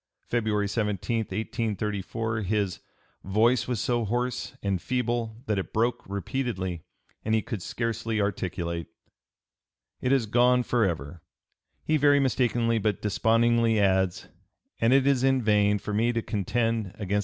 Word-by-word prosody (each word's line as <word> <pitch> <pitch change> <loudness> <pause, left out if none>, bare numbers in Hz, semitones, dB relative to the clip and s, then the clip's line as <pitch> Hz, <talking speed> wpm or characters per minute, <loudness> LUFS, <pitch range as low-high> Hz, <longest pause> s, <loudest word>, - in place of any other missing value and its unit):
February 110 -3 0
17, 105 0 -1
1834, 110 0 -2
his 100 -2 -1 0.4
"voice 110 +6 +2
was 125 -4 -1
so 120 +1 0
hoarse 120 +3 -2
and 95 -3 0
feeble 120 -3 -1
that 105 -6 0
it 95 - -5
broke 115 +3 +1
repeatedly, 100 -3 -3 0.4
and 110 +1 +1
he 110 - +2
could 110 -7 -5
scarcely 115 +1 -2
articulate. 85 -4 -2 1.1
It 125 - 0
is 135 -4 +3
gone 125 +3 +3
forever," 85 - -1 0.6
he 155 - +2
very 145 0 +5
mistakenly 120 -3 +1
but 105 -1 0
despondingly 115 +2 +3
adds, 95 -2 +1 0.5
"and 115 +1 +3
it 135 0 +5
is 135 -2 +3
in 135 0 +3
vain 105 -2 +3
for 105 +1 -5
me 115 +3 +2
to 115 -1 -1
contend 115 -1 -1
against 100 -4 -6
(p. 100 +1 +2
110 Hz, 140 wpm, -27 LUFS, 100-120 Hz, 1.1 s, very